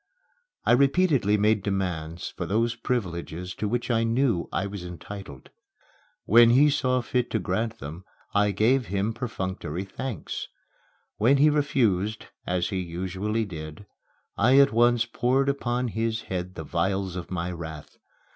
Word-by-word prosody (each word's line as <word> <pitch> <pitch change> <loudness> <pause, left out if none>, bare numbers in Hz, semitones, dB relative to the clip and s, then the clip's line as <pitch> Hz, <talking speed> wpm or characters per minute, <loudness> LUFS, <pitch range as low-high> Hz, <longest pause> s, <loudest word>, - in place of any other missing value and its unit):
I - - +4
repeatedly 135 - +3
made 105 0 +3
demands 90 -4 -3
for - - -6
those 115 +3 +1
privileges 90 -7 -3
to 105 - -3
which 120 +3 -1
I 115 -1 +2
knew 115 -5 +1
I 95 - -1
was 100 -2 -6
entitled. 90 -4 -9 0.7
When 115 +3 +7
he 140 +5 +5
saw 130 -2 +1
fit 125 0 -1
to - - 0
grant 110 +5 -2
them, 80 +3 -8 0.3
I 105 0 +3
gave 115 +5 +2
him 100 +4 -1
perfunctory 95 - -4
thanks. 110 - -5 0.7
When 125 +6 +4
he 150 +2 +5
refused 115 -9 +1 0.2
as 90 -1 0
he 95 -3 -2
usually 95 +5 -2
did 80 0 -8 0.5
I 125 +6 +4
at 140 -4 +6
once 120 0 +4
poured 130 +3 +1
upon 125 -3 -1
his 110 0 -1
head 90 -1 -4
the 80 - -5
vials 95 +3 -1
of 90 -2 -6
my 90 -1 -3
wrath. 80 -3 -8
105 Hz, 145 wpm, -26 LUFS, 90-120 Hz, 0.7 s, When